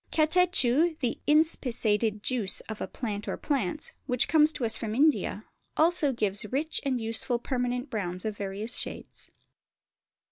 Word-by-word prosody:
Catechu, 320 Hz, -2 st, +3 dB
the 245 Hz, -3 st, -2 dB
inspissated 230 Hz, -9 st, +2 dB
juice 235 Hz, -7 st, +1 dB
of 220 Hz, -1 st, -8 dB
a -, -, -2 dB
plant 210 Hz, -4 st, -5 dB
or -, -, -3 dB
plants, 280 Hz, 0 st, -2 dB, 0.2 s
which 250 Hz, -2 st, +2 dB
comes 310 Hz, -1 st, +5 dB
to 250 Hz, -, -2 dB
us 220 Hz, -1 st, +3 dB
from 220 Hz, -1 st, -4 dB
India, 300 Hz, +4 st, +2 dB, 0.3 s
also 315 Hz, -3 st, +3 dB
gives 205 Hz, -4 st, -1 dB
rich 285 Hz, +8 st, -2 dB
and 265 Hz, -3 st, 0 dB
useful 230 Hz, +2 st, +1 dB
permanent 245 Hz, +1 st, -3 dB
browns 185 Hz, -4 st, -3 dB
of 215 Hz, -1 st, -2 dB
various 205 Hz, +4 st, -4 dB
shades. -, -, -7 dB
245 Hz, 145 wpm, -28 LUFS, 215-300 Hz, 0.3 s, comes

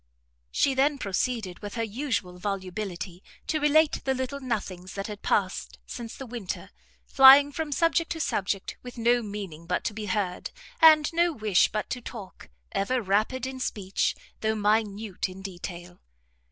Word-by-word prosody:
She 275 Hz, -, +2 dB
then 280 Hz, +2 st, +2 dB
proceeded, 205 Hz, -3 st, -2 dB
with 205 Hz, -1 st, -7 dB
her 230 Hz, -, -1 dB
usual 220 Hz, -6 st, -3 dB
volubility, 190 Hz, -2 st, -4 dB, 0.2 s
to 310 Hz, -, 0 dB
relate 300 Hz, +1 st, +3 dB
the 265 Hz, -1 st, 0 dB
little 260 Hz, +2 st, -3 dB
nothings 195 Hz, -8 st, -4 dB
that 195 Hz, 0 st, -3 dB
had 210 Hz, -1 st, -7 dB
passed 190 Hz, -2 st, -1 dB
since 235 Hz, -2 st, -7 dB
the 270 Hz, -, -7 dB
winter, 235 Hz, -6 st, -6 dB, 0.3 s
flying 275 Hz, +2 st, +8 dB
from 305 Hz, +1 st, -4 dB
subject 330 Hz, +2 st, +1 dB
to 325 Hz, -, -7 dB
subject, 195 Hz, -, -2 dB
with 245 Hz, 0 st, -10 dB
no 240 Hz, +1 st, +3 dB
meaning 195 Hz, -7 st, -7 dB
but 180 Hz, -, 0 dB
to 210 Hz, -, -2 dB
be 215 Hz, 0 st, -5 dB
heard, 185 Hz, -2 st, -2 dB, 0.3 s
and 310 Hz, -2 st, +8 dB
no 340 Hz, +1 st, +3 dB
wish 215 Hz, -, +2 dB
but 215 Hz, -, -2 dB
to 250 Hz, -, -3 dB
talk, 215 Hz, -5 st, -10 dB, 0.2 s
ever 250 Hz, +6 st, 0 dB
rapid 215 Hz, +5 st, 0 dB
in 260 Hz, 0 st, -5 dB
speech, 195 Hz, -6 st, -1 dB, 0.2 s
though 220 Hz, 0 st, 0 dB
minute 210 Hz, -2 st, 0 dB
in 190 Hz, +1 st, -10 dB
detail. 175 Hz, -2 st, -8 dB
220 Hz, 160 wpm, -27 LUFS, 195-265 Hz, 0.3 s, flying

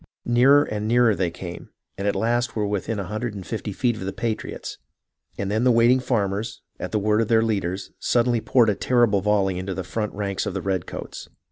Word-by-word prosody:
Nearer 130 Hz, +4 st, +5 dB
and 105 Hz, -3 st, -3 dB
nearer 120 Hz, -1 st, +4 dB
they 90 Hz, -2 st, 0 dB
came, 85 Hz, +1 st, -8 dB, 0.3 s
and 100 Hz, +1 st, -3 dB
at 100 Hz, -, +1 dB
last 115 Hz, +3 st, 0 dB
were 105 Hz, -2 st, 0 dB
within 105 Hz, +2 st, -2 dB
a 100 Hz, -, -2 dB
hundred 110 Hz, +3 st, -4 dB
and 95 Hz, -2 st, -7 dB
fifty 110 Hz, -2 st, -4 dB
feet 120 Hz, +3 st, 0 dB
of -, -, -8 dB
the 95 Hz, -, -2 dB
patriots, 115 Hz, 0 st, -4 dB, 0.6 s
and 100 Hz, 0 st, -2 dB
then 110 Hz, +3 st, +1 dB
the 130 Hz, -, +4 dB
waiting 120 Hz, +2 st, +5 dB
farmers, 105 Hz, -3 st, -2 dB, 0.2 s
at -, -, -5 dB
the 110 Hz, -, +1 dB
word 105 Hz, +1 st, +2 dB
of 115 Hz, -, 0 dB
their 115 Hz, 0 st, +4 dB
leaders, 95 Hz, -4 st, -2 dB
suddenly 120 Hz, -1 st, +2 dB
poured 115 Hz, 0 st, +3 dB
a -, -, 0 dB
terrible 120 Hz, -5 st, +2 dB
volley 95 Hz, -2 st, +1 dB
into 95 Hz, 0 st, -4 dB
the 95 Hz, -, -3 dB
front 105 Hz, +4 st, -3 dB
ranks 100 Hz, -2 st, -2 dB
of -, -, -4 dB
the 95 Hz, -, -2 dB
red 95 Hz, -3 st, -1 dB
coats. -, -, -8 dB
105 Hz, 220 wpm, -24 LUFS, 100-115 Hz, 0.6 s, Nearer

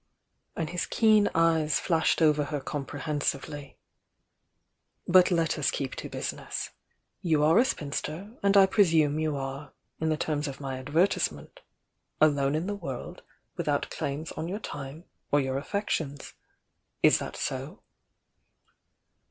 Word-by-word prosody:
and 160 Hz, -1 st, -3 dB
his 180 Hz, -, -2 dB
keen 215 Hz, -2 st, +4 dB
eyes 160 Hz, -2 st, +3 dB
flashed 165 Hz, -1 st, +2 dB
over 150 Hz, -2 st, +4 dB
her 145 Hz, 0 st, -3 dB
comprehensively. 145 Hz, 0 st, -4 dB, 1.3 s
"But 180 Hz, 0 st, +6 dB
let 165 Hz, -3 st, +1 dB
us 145 Hz, -, +2 dB
keep 135 Hz, -2 st, -3 dB
to -, -, -6 dB
business. -, -, -4 dB, 0.5 s
You 155 Hz, -4 st, +2 dB
are 160 Hz, +7 st, +5 dB
a 250 Hz, -, +5 dB
spinster, 160 Hz, -, -4 dB
and 200 Hz, 0 st, +4 dB
I 195 Hz, -, +9 dB
presume 160 Hz, -7 st, +3 dB
you 155 Hz, -2 st, 0 dB
are, 135 Hz, +1 st, -5 dB, 0.3 s
in 160 Hz, -, 0 dB
the 155 Hz, -, +1 dB
terms 150 Hz, -1 st, -1 dB
of 140 Hz, -1 st, -6 dB
my 135 Hz, -2 st, -4 dB
adver 145 Hz, +7 st, +3 dB
tisement, -, -, -3 dB, 0.6 s
'alone 145 Hz, -2 st, +3 dB
in 160 Hz, +3 st, -1 dB
the 205 Hz, -, -2 dB
world, 165 Hz, -11 st, -6 dB, 0.4 s
without -, -, -1 dB
claims 145 Hz, +4 st, -4 dB
on 160 Hz, -, -5 dB
your 190 Hz, +4 st, -3 dB
time 145 Hz, -5 st, -7 dB, 0.3 s
or 145 Hz, -, +4 dB
your 135 Hz, -1 st, -1 dB
affections.' 150 Hz, -5 st, -3 dB, 0.7 s
Is -, -, +6 dB
that -, -, -6 dB
so?" -, -, -4 dB
155 Hz, 140 wpm, -28 LUFS, 140-170 Hz, 1.3 s, I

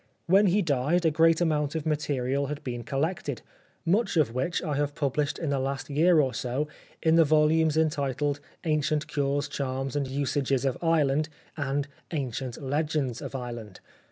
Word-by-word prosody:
When 195 Hz, +4 st, +5 dB
he 195 Hz, +3 st, +3 dB
died 155 Hz, +3 st, +1 dB
a 160 Hz, -, +4 dB
great 165 Hz, +2 st, +4 dB
amount 150 Hz, -3 st, +1 dB
of 160 Hz, -1 st, -2 dB
material 140 Hz, -3 st, 0 dB
had 150 Hz, +1 st, -5 dB
been 120 Hz, -2 st, -4 dB
col 135 Hz, 0 st, -2 dB
lected, 170 Hz, +4 st, -2 dB, 0.4 s
much 195 Hz, +2 st, +2 dB
of 145 Hz, -8 st, +3 dB
which 130 Hz, +8 st, -1 dB
I 150 Hz, -4 st, -1 dB
have 145 Hz, 0 st, -1 dB
published 145 Hz, 0 st, 0 dB
in 160 Hz, -4 st, -2 dB
the 140 Hz, -, +1 dB
last 135 Hz, +2 st, -3 dB
year 165 Hz, +3 st, +4 dB
or 135 Hz, -3 st, +2 dB
so 130 Hz, +4 st, -2 dB, 0.4 s
in 160 Hz, 0 st, +4 dB
the 165 Hz, -, +7 dB
volumes 155 Hz, +1 st, +3 dB
entitled 145 Hz, -2 st, 0 dB, 0.2 s
' -, -, -41 dB
Ancient 155 Hz, -2 st, +1 dB
Cures, 145 Hz, 0 st, 0 dB
Charms 135 Hz, -1 st, -3 dB
and 140 Hz, -2 st, 0 dB
Usages 135 Hz, 0 st, 0 dB
of 135 Hz, -, +1 dB
Ireland,' 155 Hz, -3 st, +2 dB, 0.3 s
and 145 Hz, -1 st, -1 dB
' -, -, -35 dB
Ancient 130 Hz, -5 st, -3 dB
Legends 145 Hz, -3 st, -1 dB
of -, -, -6 dB
Ireland.' 120 Hz, -6 st, -6 dB
145 Hz, 180 wpm, -27 LUFS, 135-160 Hz, 0.4 s, the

